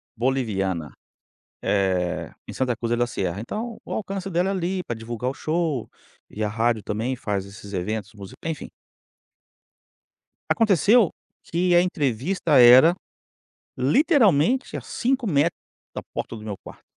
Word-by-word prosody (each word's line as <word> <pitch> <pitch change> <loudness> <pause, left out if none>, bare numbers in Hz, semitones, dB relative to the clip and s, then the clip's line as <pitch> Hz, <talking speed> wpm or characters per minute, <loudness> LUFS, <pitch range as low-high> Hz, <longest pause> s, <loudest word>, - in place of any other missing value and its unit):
boliviana, 100 - -1 0.7
eh, 95 -3 0
em - - -7
Santa 125 -2 -1
Cruz 115 0 -3
de 120 - +2
La 120 +1 +1
Sierra 95 -5 -3
então, 220 - -5
o - - -8
alcance 195 -2 -4
dela 175 +2 +1
é - - 0
ali 185 0 -2
para 120 - -4
divulgar 115 +2 -4
o - - -6
show, 155 -5 -1 0.4
e 110 - -5
a - - 0
rádio 115 +1 0
também 115 +6 -2
faz 100 -5 -3
esses 100 0 -11
eventos 105 +3 -3
músic 100 -2 -11
enfim. 160 -2 -4 1.8
Aconteceu 215 0 +4 0.3
que 175 +1 +1
a 175 - +6
entrevista 150 - +1
era, 125 +7 +8 0.8
literalmente 230 - +3
a - - -4
5 260 0 -1
metros 160 -2 +1 0.4
da - - -5
porta - - -4
do 110 - -10
meu 105 -2 -5
quarto. - - -13
130 Hz, 145 wpm, -24 LUFS, 110-180 Hz, 1.8 s, era